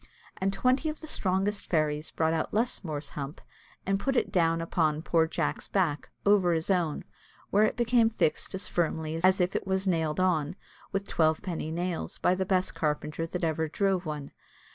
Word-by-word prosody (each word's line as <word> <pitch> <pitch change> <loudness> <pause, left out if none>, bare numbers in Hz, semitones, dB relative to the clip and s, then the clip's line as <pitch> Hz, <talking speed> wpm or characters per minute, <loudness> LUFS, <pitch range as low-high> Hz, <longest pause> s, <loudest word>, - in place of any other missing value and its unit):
And 190 +1 0
twenty 255 +9 +1
of 305 - -5
the - - -7
strongest 200 -6 -1
fairies 155 -2 +1
brought 160 0 0
Lusmore's 180 -10 -2
hump, 140 0 -6 0.5
and 195 0 +1
put 270 +5 0
it - - +1
down 165 -2 +2
upon 160 -2 0
poor 165 -2 +3
Jack's - - -2
back, 165 -7 0 0.2
over 195 -4 +4
his 160 +3 0
own, 170 -5 0 0.5
where 210 +2 +5
it - - -1
became 235 -1 +4
fixed 195 -3 0
as 190 0 -2
firmly 160 -2 -1
as 185 +1 +5
if 180 +1 +1
it - - -2
was 190 0 0
nailed 160 -4 0
on 175 -3 +1 0.4
with 195 0 -2
twelve 160 +1 +2
penny 170 -5 -3
nails, 175 +1 -3
by 180 - +3
the 185 0 -1
best 185 -1 +1
carpenter 150 +1 -2
that 180 +1 -4
ever 160 0 0
drove 190 +1 0
one. 150 -2 -5
175 Hz, 180 wpm, -29 LUFS, 160-195 Hz, 0.5 s, where